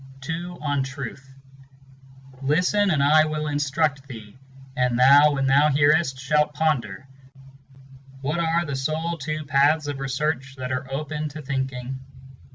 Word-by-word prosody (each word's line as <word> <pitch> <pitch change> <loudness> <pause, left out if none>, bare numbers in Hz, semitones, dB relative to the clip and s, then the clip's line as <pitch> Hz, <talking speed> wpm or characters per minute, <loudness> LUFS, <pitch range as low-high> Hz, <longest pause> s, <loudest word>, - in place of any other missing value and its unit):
1 160 - -1
II. 175 +1 -7
On 145 -2 0
Truth. 135 0 -7 1.1
11 135 +1 -8
"Listen, 180 +6 +2
and 150 -6 +2
I 155 +2 +5
will 155 0 -3
instruct 145 -1 -1
theeŌĆö 110 -4 -10 0.4
and 125 -1 +1
thou, 140 +4 +6
when 135 -1 -1
thou 140 +3 +4
hearest, 145 0 +3
shalt 150 +2 +1
ponder 135 -8 -1 1.1
What 150 +5 -2
are 170 +1 +1
the 140 -2 -4
sole 155 +5 -2
two 155 +2 -4
paths 145 +2 +3
of 145 -2 -4
research 135 0 -2
that 130 0 -5
are 130 +1 -4
open 150 +2 -3
to 150 +1 -9
thinking. 130 -1 -4
145 Hz, 150 wpm, -23 LUFS, 135-155 Hz, 1.1 s, thou